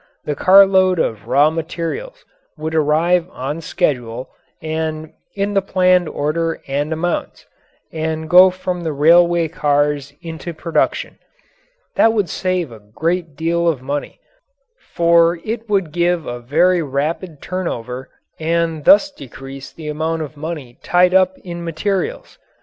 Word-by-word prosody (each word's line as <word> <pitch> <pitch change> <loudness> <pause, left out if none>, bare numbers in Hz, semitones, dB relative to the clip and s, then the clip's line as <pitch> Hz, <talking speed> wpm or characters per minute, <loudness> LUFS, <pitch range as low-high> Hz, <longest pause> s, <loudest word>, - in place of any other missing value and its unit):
The 150 - -1
carloads 190 +1 +5
of 110 -9 -2
raw 150 +2 +4
materials 170 - -5 0.3
would 155 +1 -4
arrive 160 +3 +2
on 145 +4 -5
schedule 130 -7 -2 0.3
and 155 0 -4 0.2
in 200 +1 -1
the 195 - +3
planned 185 -2 +2
order 165 +3 -1
and 145 +3 -2
amounts, 165 +2 -3 0.5
and 160 0 -3
go 180 +3 +8
from 180 -1 -4
the 160 -2 -3
railway 170 +3 +4
cars 145 -2 0
into 165 0 -7
production. 165 +1 -1 0.8
That 225 - +5
would 205 -5 0
save 185 -6 -2
a 110 - -11
great 160 - -3
deal 170 +2 0
of 145 -6 0
money, 140 +2 -4 0.8
for 170 0 +4
it 225 0 -4
would 195 -6 0
give 175 0 0
a 120 0 -5
very 170 +9 +2
rapid 150 +3 -3
turnover 130 -9 -5 0.3
and 165 -1 -1
thus 290 +1 +6
decrease 135 - -10
the 160 -2 -10
amount 160 +2 -2
of 150 0 -9
money 145 -5 -7
tied 180 +1 +3
up 185 0 +3
in 170 -1 -6
materials. 195 - -3
165 Hz, 135 wpm, -18 LUFS, 150-180 Hz, 0.8 s, go